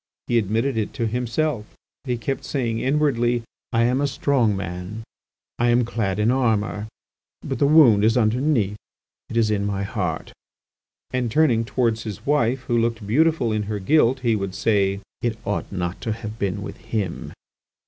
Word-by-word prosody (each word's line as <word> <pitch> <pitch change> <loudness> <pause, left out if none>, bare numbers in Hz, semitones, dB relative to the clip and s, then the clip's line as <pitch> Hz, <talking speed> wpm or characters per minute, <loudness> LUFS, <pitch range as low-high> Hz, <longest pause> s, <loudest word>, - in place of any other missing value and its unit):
He 120 - +2
admitted 115 +5 0
it 105 -2 -2
to 120 - -1
himself, 120 +1 -2 0.3
he 125 -2 -1
kept 135 +4 -3
saying 115 -5 -1
inwardly, 125 -4 +1 0.3
"I 115 -1 +3
am 125 +3 +2
a 145 - +2
strong 125 -7 +1
man; 90 +4 -5 0.6
I 120 0 +3
am 120 0 +3
clad 100 -4 -1
in 105 +3 +3
armour; 105 -6 0 0.6
but - - -3
the 140 - +4
wound 135 -9 +6
is 115 +3 +4
underneath, 115 -2 +1 0.5
it 115 - -3
is 110 -2 +3
in 100 -1 0
my 100 -1 -1
heart," 95 -6 -3 0.8
and 125 -2 -1
turning 125 -5 +3
towards 115 -2 0
his 105 -4 -7
wife, 130 -3 +2
who 120 -2 0
looked 115 -2 -1
beautiful 145 +1 +2
in 110 0 0
her 105 - -1
guilt, 130 +4 +3
he 115 -3 +2
would 100 -2 -3
say: 100 -1 +1 0.2
"It 115 -2 -1
ought 105 - -2
not 90 -2 -3
to 115 -3 -1
have 110 0 -7
been 95 -2 -2
with - - -7
him." 100 -6 -4
115 Hz, 170 wpm, -23 LUFS, 105-125 Hz, 0.8 s, wound